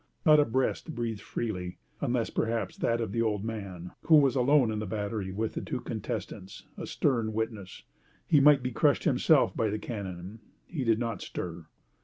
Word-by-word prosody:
Not 155 -2 +7
a 145 - +5
breast 130 +6 -1
breathed 115 -3 -3
freely, 90 -6 -4 0.2
unless 125 -4 0
perhaps 115 -4 -1
that 115 0 0
of 115 -4 -2
the 115 - 0
old 105 -2 0
man, 95 -6 -6
who 160 - +7
was 140 -3 +5
alone 130 -2 +4
in 105 - -2
the 105 - -4
battery 105 -1 -3
with 110 +3 -2
the - - -3
two - - -4
contestants, 95 +1 -6
a - - -6
stern 115 -6 0
witness. 110 -4 -4 0.4
He 150 - +5
might 140 -1 +6
be 125 - -2
crushed - - +2
himself - - +3
by 110 - +1
the 105 - -1
cannon. 100 -2 -6 0.3
He 155 -6 -4
did 115 -2 +3
not 115 -1 -3
stir. 85 -2 -6
110 Hz, 185 wpm, -29 LUFS, 100-125 Hz, 0.4 s, Not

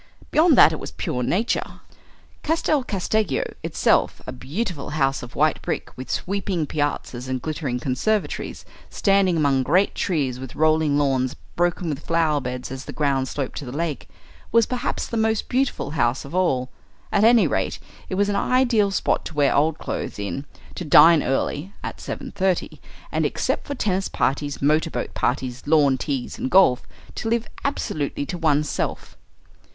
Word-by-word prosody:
Beyond 315 -3 +5
that 160 - +8
it 155 - -4
was - - -6
pure 125 - -3
nature. 200 - -1 0.6
Castel 310 -3 +1
Casteggio 200 - 0 0.2
itself, - - +1
a - - -5
beautiful 150 - -4
house 135 -2 +1
of 120 -1 -10
white - - +2
brick - - -4
with 130 - -8
sweeping 190 -3 -1
piazzas 145 -4 -3
and 130 0 -2
glittering 145 -3 -3
conservatories, 165 - -2 0.2
standing 195 -3 +2
among 140 -3 +2
great 180 +9 +2
trees 140 -9 -1
with 130 -1 -8
rolling 155 -2 +3
lawns 130 -3 +1 0.2
broken 175 0 0
with 150 0 -4
flower 160 -3 +1
beds 125 0 -5
as 135 0 -6
the - - -6
ground 135 -3 0
sloped 135 -1 -4
to 145 - -7
the 125 - -6
lake, 155 +1 -3 0.4
was 230 -1 +5
perhaps 250 0 -2
the 230 - -4
most 220 -1 +1
beautiful 255 - -1
house 130 -4 0
of 140 - -10
all; 135 -9 +1 0.4
at 205 - +3
any 230 0 +6
rate, - - -1 0.3
it - - -2
was 200 +1 +2
an 205 - 0
ideal 240 -2 +3
spot 195 - 0
to 160 - -7
wear 145 -2 +3
old 155 +2 +2
clothes - - -4
in, 105 +8 -4 0.3
to - - -5
dine 160 +1 +7
early 145 +7 -2
(at - - -5
7.30) 190 -2 -2 0.3
and, - - 0
except - - -1
for 285 - -3
tennis 195 -5 0
parties, 140 +2 -1
motor 155 +3 +3
boat 120 -5 -4
parties, 125 0 -1
lawn 145 -3 +4
teas, 130 -1 -4
and - - -2
golf, 180 -9 +4 0.3
to 225 - -3
live 230 0 0 0.2
absolutely 150 - -2
to 175 +4 -5
oneself. 150 -2 -1
155 Hz, 165 wpm, -23 LUFS, 135-195 Hz, 0.6 s, that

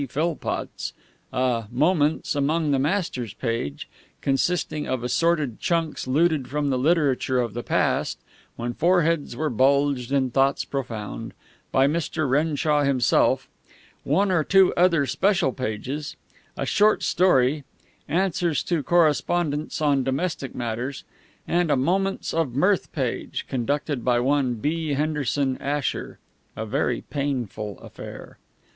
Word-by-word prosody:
Philpotts; 160 +4 -3 0.4
a 125 -3 0
"Moments 150 +3 +2
among 150 +2 +1
the 135 - +2
Masters" 140 - -1
page, 115 - -3 0.3
consisting 150 +2 0
of 130 -2 -2
assorted 145 0 +1
chunks 165 -5 -1
looted 150 0 +2
from 145 0 -1
the 130 - 0
literature 140 -4 +2
of 120 -4 -1
the 120 - -3
past, - - 0 0.4
when 120 +1 -3
foreheads 165 -3 +2
were 155 +3 -1
bulged 135 +1 +2
and 130 -3 +1
thoughts 135 0 +2
profound, 115 -7 -5 0.4
by 135 - +4
Mr. 155 0 0
Renshaw 150 +2 +2
himself; 140 -3 +2 0.6
one 200 0 +2
or 170 -4 +2
two 190 +3 +5
other 170 -5 +3
special 170 - +1
pages; 130 +5 -4 0.4
a - - -2
short 215 +1 +3
story; 150 -5 +3 0.5
answers 170 -4 +1
to 170 -4 0
correspondents 155 0 +1
on 140 -3 +2
domestic 135 +1 -2
matters; 120 +3 -4 0.4
and 175 -1 +1
a 145 - +4
"Moments 190 +8 0
of 160 -7 -1
Mirth" 185 +7 +2
page, 130 -5 -3
conducted 140 +1 -2
by 120 -1 +2
one 130 -1 +1
B. 150 +5 -1
Henderson 145 -2 0
Asher 145 0 -2 0.4
a - - -4
very - - -1
painful 125 -8 -3
affair. - - -10
145 Hz, 125 wpm, -24 LUFS, 130-165 Hz, 0.6 s, two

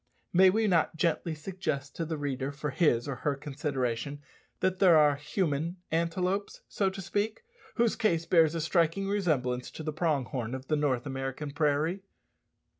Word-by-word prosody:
May 185 +2 +7
we 220 +4 +2
not 170 -5 +2
gently 165 0 0
suggest 150 -4 -4
to 165 - -2
the 160 0 -3
reader 140 -1 -2
for 150 0 -4
his 130 -5 +2
or 135 -3 -3
her 145 -2 -1
consideration 140 -2 -3 0.4
that 185 0 0
there 180 -5 +7
are 150 -2 +5
human 155 +2 -2
antelopes, 180 +4 -1
so 195 -2 0
to 190 +1 -7
speak, 205 - -2 0.3
whose 235 -2 +2
case 170 -8 +1
bears 165 -2 +4
a 165 - -1
striking 170 +4 +1
resemblance 145 -11 0
to 160 - -8
the 155 0 -3
prong 155 -5 0
horn 120 0 -4
of 130 0 -9
the 155 - +3
North 140 -4 0
American 135 +1 -4
prairie? 155 +5 +1
155 Hz, 170 wpm, -29 LUFS, 140-180 Hz, 0.4 s, May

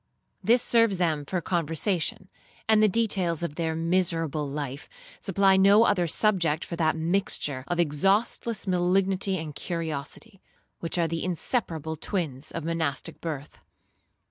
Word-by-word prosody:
This 240 +2 +4
serves 230 -4 +3
them 160 -5 0
for 185 - -1
conversation; 170 +2 -1 0.4
and 220 -1 +5
the 215 - +6
details 190 -6 +1
of 170 - -3
their 160 0 -2
miserable 165 -3 0
life 140 -1 -5 0.3
supply 195 0 +3
no 200 +3 +6
other 180 -6 +2
subject 170 -4 +1
for 170 - -5
that 160 -1 +2
mixture 160 -5 0
of 175 0 -2
exhaustless 195 +8 +1
malignity 190 +1 +1
and 160 -3 -6
curiosity, 165 +6 -5 0.4
which 165 +1 -3
are 170 -1 +2
the 165 0 -3
inseparable 165 - -2
twins 155 -6 -3
of 165 - -5
monastic 160 -3 -3
birth. 150 -4 -6
170 Hz, 135 wpm, -26 LUFS, 160-195 Hz, 0.4 s, the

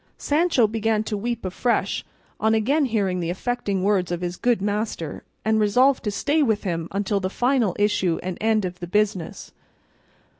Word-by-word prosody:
Sancho 300 -5 +2
began 220 0 0
to 215 - -3
weep 230 +1 -3
afresh 230 +6 0 0.4
on 220 +1 +3
again 275 +8 +2
hearing 200 -7 0
the 170 -1 -2
affecting 200 0 -2
words 190 -3 +1
of 175 0 -2
his 175 0 -3
good 240 +3 +1
master, 205 -6 -3 0.2
and 220 0 +3
resolved 250 +6 +3
to - - +1
stay 290 +10 +1
with 220 -7 +1
him 170 -4 -2
until 200 0 -1
the 185 -1 -2
final 245 -3 +1
issue 200 -5 +1
and 185 0 -3
end 220 -2 +2
of 180 0 -5
the 175 - -6
business. 200 -2 -1
210 Hz, 175 wpm, -23 LUFS, 185-230 Hz, 0.4 s, on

